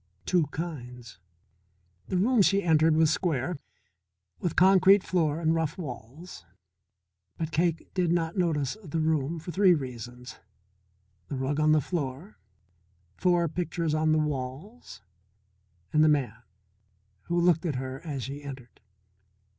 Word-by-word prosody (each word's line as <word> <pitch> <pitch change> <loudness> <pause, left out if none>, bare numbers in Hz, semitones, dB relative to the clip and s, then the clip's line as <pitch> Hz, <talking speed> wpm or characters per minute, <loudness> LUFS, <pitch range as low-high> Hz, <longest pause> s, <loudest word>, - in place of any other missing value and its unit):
Two 175 -5 +2
kinds. 125 - -7 0.9
The 185 - -1
room 230 +4 +3
she 200 +1 +3
entered 160 -1 +4
was 160 -1 +4
square, 160 -2 -1 0.8
with 175 - -2
concrete 190 +1 +6
floor 160 -4 0
and 160 -1 +1
rough 160 -1 -1
walls. 135 - -9 0.9
But 160 -1 -3
Cake 165 0 -1
did 180 -3 +1
not 165 -1 0
notice 160 -7 0
the 165 -2 -3
room 155 0 0
for 165 +2 -7
three 185 -1 +5
reasons: 125 -3 -8 0.9
The - - -4
rug 135 +3 -1
on 155 0 +4
the 155 -1 +4
floor, 150 +4 -5 0.8
four 175 -2 +2
pictures 165 -1 -2
on 155 0 +2
the 155 - +3
walls, 150 - -5 0.9
and 155 - +5
the 155 - +5
man 125 -6 0 0.8
who 175 0 0
looked 170 0 +2
at 150 - -2
her 130 +1 -5
as 145 -6 -4
she 140 +3 -6
entered. 130 -4 -10
155 Hz, 135 wpm, -27 LUFS, 135-175 Hz, 0.9 s, concrete